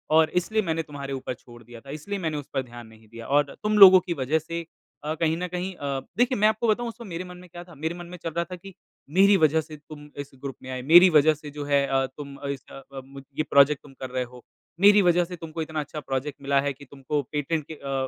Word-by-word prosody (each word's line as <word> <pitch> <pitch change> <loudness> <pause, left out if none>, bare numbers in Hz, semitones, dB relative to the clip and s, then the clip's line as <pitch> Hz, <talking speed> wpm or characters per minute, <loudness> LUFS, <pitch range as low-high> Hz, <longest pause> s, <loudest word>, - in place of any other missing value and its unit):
और 160 0 +5
इसलिए 220 +5 -1
मैंने 165 -4 -2
तुम्हारे 140 -2 -7
ऊपर 130 -1 -4
छोड़ 120 -1 -15
दिया 120 +1 -12
था, 140 - -15
इसलिए 155 +8 -5
मैंने 160 -4 -2
उस 145 - -7
पर 135 - 0
ध्यान 120 -1 -11
नहीं 110 0 -18
दिया 115 +1 -10
और 145 0 +1
तुम 210 0 +1
लोगों 190 -2 +11
की 180 -1 -4
वजह 145 +1 0
से 165 +2 -6 0.4
अ, 155 +1 -2
कहीं 160 0 0
न 180 +1 -3
कहीं 180 +2 -4
अ, 140 -4 -3 0.2
देखिए, 250 +2 +2
मैं 210 +1 +4
आपको 220 +2 0
बताऊँ 235 +2 +1
उस 230 - -9
वक़्त 225 - -9
मेरे 170 +1 -4
मन 180 0 -10
में 180 0 -14
क्या 175 0 -9
था 175 -1 -16
कि? - - -18
मेरे 160 +2 -2
मन 175 0 -8
में 180 +1 -9
चल 165 - -3
रहा 170 +2 -1
था 180 +2 -8
कि 195 +2 -12 0.4
मेरी 195 +5 +5
वजह 160 -1 +3
से 155 0 -11
तुम 150 0 -13
इस 140 0 -6
ग्रुप 135 0 -7
में 130 - -9
आए। 130 0 -4
मेरी 175 +7 +8
वजह 155 -1 +5
से 150 0 -10
जो 145 0 -6
है 140 -1 +2
अ, 135 0 +1
तुम 140 -2 -8
इस 140 -1 -4
अ 135 - -10
अ, 135 - -6
मुझ 135 0 -12
ये 155 - +1
प्रोजेक्ट 140 0 +4
तुम 145 - -15
कर 130 - -5
रहे 130 0 -2
हो। 125 0 -13 0.4
मेरी 205 +1 +7
वजह 175 -1 +3
से 180 +1 -8
तुमको 165 0 -6
इतना 155 0 -4
अच्छा 150 +1 -5
प्रोजेक्ट 135 0 -4
मिला 140 0 +2
है 140 0 -2
कि 140 +2 -15
तुमको 140 +2 -3
पेटेंट 150 +1 -2
के - - -4
अ 140 - -10
अ, 135 -1 -1
150 Hz, 280 wpm, -25 LUFS, 140-175 Hz, 0.4 s, लोगों